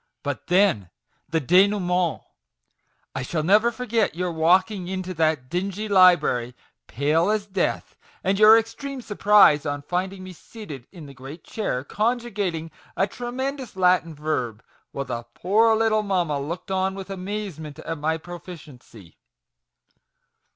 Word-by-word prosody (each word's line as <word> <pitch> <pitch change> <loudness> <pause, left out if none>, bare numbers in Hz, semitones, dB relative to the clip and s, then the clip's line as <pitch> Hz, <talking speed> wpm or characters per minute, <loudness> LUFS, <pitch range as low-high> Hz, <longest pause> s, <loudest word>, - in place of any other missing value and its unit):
But 145 -2 -4
then 180 - +2 0.4
the 165 +1 +1
denouement! 180 +1 +2 0.9
I 130 - -3
shall 155 +5 -2
never 210 +7 +4
forget 235 -5 -1
your 180 0 -2
walking 180 +4 +2
into 185 0 -4
that 155 -5 0
dingy 195 +6 -3
library, 175 - +4 0.3
pale 155 - +1
as 215 -1 0
death, 195 -2 -2 0.3
and 195 +1 +1
your 215 +1 +9
extreme 250 +4 -4
surprise 205 -8 +5
on 145 -1 -4
finding 185 +3 -3
me 185 0 -9
seated 155 - -11
in 170 -5 -11
the 140 - -11
great 135 +5 -11
chair, 130 - -3
conjugating 205 - -2 0.3
a 195 - +3
tremendous 250 +3 -5
Latin 180 -3 +2
verb, 130 -7 -3 0.3
while 140 - -4
the 120 -2 -4
poor 220 +5 +3
little 220 -1 +2
mamma 180 -8 -1
looked 170 +7 -6
on 190 0 0
with 195 0 -8
amazement 185 -6 -6
at 165 -2 -6
my 160 +2 0
proficiency 155 - -12
180 Hz, 135 wpm, -24 LUFS, 155-205 Hz, 0.9 s, your